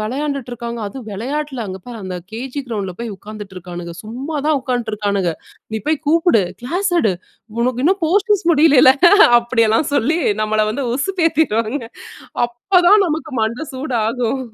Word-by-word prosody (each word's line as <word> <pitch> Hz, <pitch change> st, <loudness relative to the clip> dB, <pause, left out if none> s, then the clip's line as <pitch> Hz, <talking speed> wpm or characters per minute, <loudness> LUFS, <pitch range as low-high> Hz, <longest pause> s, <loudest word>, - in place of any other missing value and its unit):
விளையான்டுட்ருக்காங்க, 240 Hz, -1 st, -4 dB
அதுவும் 235 Hz, +2 st, -8 dB
வெளையாட்டுல, 270 Hz, +5 st, -4 dB
அங்க 190 Hz, 0 st, -6 dB
பாரு 240 Hz, -2 st, -7 dB
அந்த 185 Hz, -1 st, -5 dB
கேஜி 255 Hz, +5 st, -5 dB
கிரவுண்ட்ல 200 Hz, -5 st, -3 dB
போய் 235 Hz, -3 st, -5 dB
உக்காந்துட்ருக்கானுங்க. 185 Hz, -5 st, -8 dB
சும்மாதான் 280 Hz, +6 st, -2 dB
உக்காந்ட்டுருக்கானுங்க. 210 Hz, -7 st, -1 dB, 0.4 s
நீ -, -, 0 dB
போய் 310 Hz, 0 st, +2 dB
கூப்புடு, 325 Hz, -, +4 dB, 0.2 s
கிளாஸ் 360 Hz, +10 st, -1 dB
எடு. 215 Hz, -5 st, +2 dB, 0.5 s
உனக்கு 250 Hz, +1 st, 0 dB
இன்னும் 385 Hz, +4 st, +2 dB
போர்ஷன்ஸ் 405 Hz, +3 st, +2 dB
முடியலல்ல, 290 Hz, -4 st, +6 dB
ஹ -, -, +7 dB, 0.3 s
அப்டிலாம் 230 Hz, +2 st, +1 dB
சொல்லி 290 Hz, +5 st, +2 dB, 0.2 s
நம்மள 215 Hz, 0 st, +1 dB
வந்து 270 Hz, +4 st, -3 dB
உசுப்பேத்திருவாங்க. 295 Hz, -, 0 dB, 0.6 s
அப்பதான் 360 Hz, -, +3 dB
நமக்கு 310 Hz, -1 st, -4 dB
மண்ட 235 Hz, +8 st, -2 dB
சூடாகும் 245 Hz, -1 st, -1 dB
250 Hz, 130 wpm, -18 LUFS, 220-305 Hz, 0.6 s, ஹ